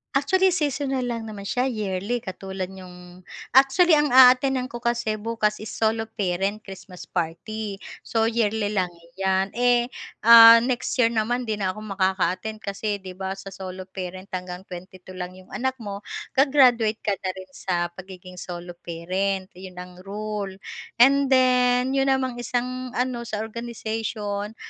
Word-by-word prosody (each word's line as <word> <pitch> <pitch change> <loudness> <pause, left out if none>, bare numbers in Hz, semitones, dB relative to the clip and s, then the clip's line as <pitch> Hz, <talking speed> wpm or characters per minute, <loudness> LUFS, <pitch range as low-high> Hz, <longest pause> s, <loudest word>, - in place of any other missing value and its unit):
Actually, 370 +6 +3
seasonal 275 -4 -1
lang 230 -2 -4
naman 210 -2 -8
siya 250 +5 0
yearly 215 0 -2
katulad 190 0 -6
niyong, 180 -1 -13 0.2
actually 275 +7 +5
ang 295 0 +4
aatenan 255 0 +5
ko 240 - -6
kasi 235 -2 -1
bukas 215 -1 -1
is 215 - -7
solo 225 0 0
parent 200 0 -2
Christmas 190 -2 -10
party, 195 +5 -4 0.3
so 225 -1 +1
yearly 220 -2 0
lang 185 -4 +1 0.3
'yan. 190 0 +1
Eh, 245 +1 +2 0.3
ah, 230 0 +11
next 250 -1 -1
year 230 -2 +4
naman 235 +3 0
'di 215 -2 -3
na 190 -2 0
ako 215 - -8
makaka-attend 190 +2 -1
kasi 205 +1 -3
'di 185 -1 -7
ba 190 0 -3
sa 195 0 -9
solo 185 0 -7
parent 185 0 -7
hanggang 180 0 -5
22 185 0 -11
lang 185 0 -6
'yong 185 - -17
anak 260 +1 -1
mo 205 -4 -6 0.3
ga-graduate 250 -6 +4
ka 205 - +1
na 190 - -2
rin 185 0 -10
sa 175 -2 -1
pagiging 185 -1 -11
solo 175 0 -7
parent 185 +3 -3
'yon 185 -1 -10
ang 180 0 -9
rule. 205 0 -5 0.4
And 275 +3 +5
then 250 -1 +3
'yon 270 0 +2
namang 260 -2 0
isang 255 +1 -3
ano 250 -1 -1
sa 215 -2 -3
organization, 220 -2 -4
215 Hz, 155 wpm, -24 LUFS, 190-245 Hz, 0.4 s, ah